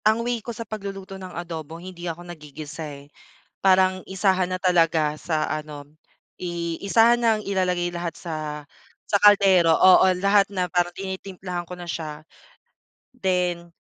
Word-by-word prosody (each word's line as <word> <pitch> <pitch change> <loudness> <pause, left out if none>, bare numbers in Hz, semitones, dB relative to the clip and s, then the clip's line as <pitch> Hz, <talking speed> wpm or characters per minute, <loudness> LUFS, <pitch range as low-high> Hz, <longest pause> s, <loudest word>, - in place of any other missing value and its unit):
ang 220 +2 +2
way 240 -1 -1
ko 225 - -21
sa 230 - -5
pagluluto 195 -2 -7
ng 185 - -7
adobo 165 -2 -6
hindi 175 0 -8
ako 170 +1 -6
naggigisa, 155 -2 -8 0.2
eh. 145 - -25 0.5
Parang 185 -1 +4
isahan 190 -1 0
na 185 - -2
talaga 165 -4 +2
sa 155 0 -2
ano, 150 -2 -5 0.5
i 170 -2 -4
isahan 225 +4 +5
nang 220 -2 +3
ilalagay 180 -3 0
lahat 170 -1 -3
sa 165 -3 -5 0.7
sa 200 - +3
kaldero, 195 -5 +6
oo. 185 +4 +7 0.2
Lahat 200 +1 +3
na 185 -2 -1
parang 175 0 0
tinitimplahan 190 -1 -6
ko 180 +1 -10
na 175 - -8
siya. 155 -2 -6 0.8
Then, 180 -6 -2
180 Hz, 145 wpm, -24 LUFS, 170-195 Hz, 0.8 s, oo